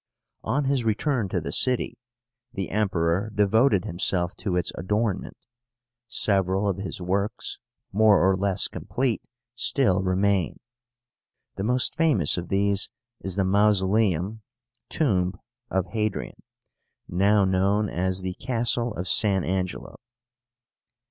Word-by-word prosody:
On 145 +2 0
his 135 -2 +1
return 115 0 0
to 90 - -1
the 80 - -5
city, 125 -2 0 0.5
the 95 -2 -4
Emperor 95 -1 0
devoted 105 0 +3
himself 90 0 -1
to 95 -4 -2
its 90 -1 0
adornment. 105 +2 -2 0.7
Several 95 -2 0
of 95 -2 0
his 95 -1 -5
works, 100 +4 -2 0.3
more 105 0 +5
or 95 - +4
less 95 0 +1
complete, 125 -4 -2 0.3
still 120 -5 +1
remain. 95 -1 +1 1.0
The 95 - -4
most 125 +1 +1
famous 145 - +2
of 90 -1 -5
these 100 0 +1 0.3
is 95 -2 -2
the 100 - +1
MAUSOLÉUM 100 0 +2 0.5
(Tomb) 95 - 0 0.3
OF 95 -2 0
HADRIAN, 105 +2 -3 0.7
now 100 +3 +3
known 100 +3 +2
as 95 +1 -2
the 95 0 -3
Castle 120 0 -1
of 90 - -4
San 95 -3 +3
Angelo. 90 0 -3
100 Hz, 120 wpm, -25 LUFS, 95-110 Hz, 1.0 s, more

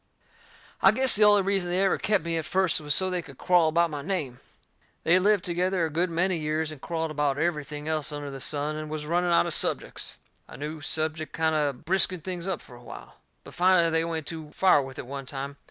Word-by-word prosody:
I - - +7
guess 260 -1 +5
the 210 0 +5
only 205 -1 +5
reason 195 -2 0
they 180 +2 +2
ever 190 - +1
kep' 205 -5 +1
me 170 0 -2
at 160 -2 -2
first 185 -5 +1
was 150 0 +1
so 185 0 +3
they 180 -1 -1
could 140 -5 -14
quarrel 175 -3 +3
about 170 +1 +2
my 145 -1 -5
name. 145 -8 -3 0.6
They'd 175 +3 +4
lived 200 0 +2
together 180 0 0
a 160 - -4
good 175 +4 0
many 175 +2 0
years 155 +1 -1
and 150 -3 -11
quarrelled 165 -2 -3
about 145 -2 0
everything 150 -2 -3
else 155 -1 -1
under 145 -1 -6
the 135 - -7
sun, 150 +2 -3
and 155 0 -6
was 155 -1 -5
running 175 +3 0
out 170 - +4
of - - -3
subjects. - - -2 0.3
A - - -11
new 150 +2 -6
subject 155 +1 -2
kind 160 0 +1
o' 150 -2 +1
briskened 180 +5 +1
things 180 -1 -5
up 190 -4 -2
fur - - -15
a - - -16
while. - - -11 0.3
But - - -13
finally 175 -2 +3
they 160 0 +2
went 165 -2 -3
too 160 -1 -6
far 185 -6 +4
with 135 -1 -9
it - - -6
one 135 +1 -7
time. 140 0 -6
160 Hz, 235 wpm, -26 LUFS, 150-180 Hz, 0.6 s, I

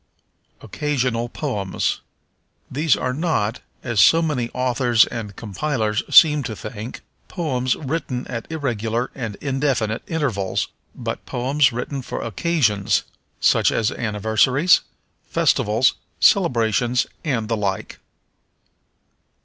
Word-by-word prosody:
Occasional 125 -5 -1
Poems. 105 -10 -2 0.7
These 150 +2 +2
are 130 0 -2
not, 135 -8 -1 0.2
as 120 -5 +2
so 165 - +6
many 130 -7 -1
authors 125 -2 +3
and 105 -4 -6
compilers 110 +1 -2
seem 150 -3 +7
to 115 -5 -5
think, 110 +3 -7 0.3
poems 130 -8 -1
written 135 -4 -3
at 115 +4 -6
irregular 120 -5 -2
and 115 -6 -5
indefinite 135 -6 0
intervals, 120 - -1 0.3
but - - -5
poems 135 +4 +2
written 125 +3 -4
for - - -5
occasions, 115 - +1 0.4
such - - +3
as 110 -2 +1
anniversaries, 115 - +2 0.5
festivals, 110 +5 +2 0.3
celebrations 120 - +3 0.2
and 125 -8 -1
the 115 - 0
like. 100 -3 -3
125 Hz, 105 wpm, -21 LUFS, 110-145 Hz, 0.7 s, seem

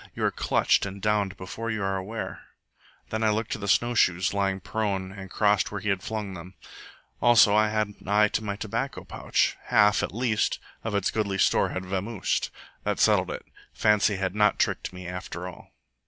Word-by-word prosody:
You - - -3
are - - +2
clutched - - +2
and 100 0 -7
downed 105 -1 0
before 110 +5 -5
you 110 -3 -2
are 95 0 0
aware. 100 +4 -5 0.7
Then 110 - -1
I 110 - +3
looked 110 +1 -1
to - - -2
the 100 - -5
snowshoes, 95 -5 +2
lying 100 -1 0
prone 95 -1 -2
and 95 -1 -9
crossed 105 -1 +2
where 105 - -3
he 105 - -3
had 100 -2 0
flung 105 -2 -4
them. 90 +1 -10 0.7
Also 115 -3 +6
I 110 0 +4
had 110 -1 0
an 100 - -16
eye 105 +1 +4
to 110 - -2
my 100 -2 -3
tobacco 110 0 -3
pouch. - - 0
Half, 105 -1 +4
at - - -2
least, 115 -1 0 0.3
of 110 -2 -2
its 100 - +1
goodly 100 -3 -1
store - - +3
had 95 0 -4
vamosed. 95 +3 -1 0.3
That - - -1
settled - - +4
it. - - -6 0.3
Fancy 105 -1 +3
had 95 -1 -2
not 105 0 +3
tricked - - 0
me 90 0 -9
after 90 0 -6
all. 90 - -12
100 Hz, 195 wpm, -26 LUFS, 95-110 Hz, 0.7 s, Also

